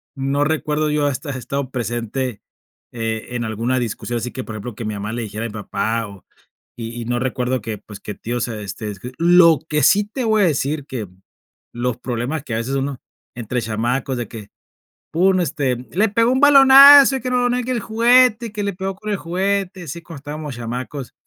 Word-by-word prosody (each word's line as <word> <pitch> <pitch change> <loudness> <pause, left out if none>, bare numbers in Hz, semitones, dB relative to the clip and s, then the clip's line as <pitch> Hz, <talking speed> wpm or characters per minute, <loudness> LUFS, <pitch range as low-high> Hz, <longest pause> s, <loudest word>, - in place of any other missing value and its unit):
no 135 +1 0
recuerdo 155 0 0
yo 150 -1 +1
haber 140 - 0 0.2
estado 140 +1 -4
presente, 120 -1 -3 0.5
eh, 115 -2 -4
en 120 -1 -2
alguna 115 +4 -1
discusión, 120 0 -3
así 120 +1 -4
que, 130 - -6
por 110 - -8
ejemplo, 110 +2 -7
que 115 - -6
mi 105 - -3
mamá 105 +2 -5
le 120 - -3
dijera 110 +1 -5
a - - -1
mi - - -11
papá 110 +1 -2
o 100 -2 -14 0.5
y 115 0 -6
y - - -6
no 120 +1 -1
recuerdo 125 0 -1
que, 110 0 -5
pues, 105 0 -12
que 105 - -7
tíos 120 +1 -3
se, 110 -3 -6
este, 100 +2 -6
escri 105 +5 -9
lo 170 -2 +6
que 150 -1 +1
sí 205 +1 +5
te 235 +5 -5
voy 220 -2 +2
a - - +5
decir 145 -2 -1
que 115 -7 -5 0.7
los 120 0 -2
problemas 125 +5 -3
que 130 - -6
a - - 0
veces 120 +4 -2
uno 135 -1 -3 0.3
entre 120 +1 -3
chamacos 120 +4 -2
de 120 -2 -4
que, 110 -3 -10 0.6
pum, 185 +3 +3
este: 140 -6 -1 0.2
"le 210 +4 +2
pegó 230 +3 +2
un 260 - +2
balonazo 275 0 +9
y - - -8
que 255 - -3
no 245 0 +2
no 245 - 0
quiere 250 0 -2
el 240 - -1
juguete 235 +2 +4
y - - -11
que 210 0 -4
le 200 0 -2
pegó 190 +1 -4
con 215 +2 -8
el 205 - 0
juguete", 190 +1 -2
así 170 +1 -7
cuando 165 -4 -10
estábamos 145 -1 -6
chamacos: 125 +2 -6
135 Hz, 215 wpm, -20 LUFS, 115-190 Hz, 0.7 s, balonazo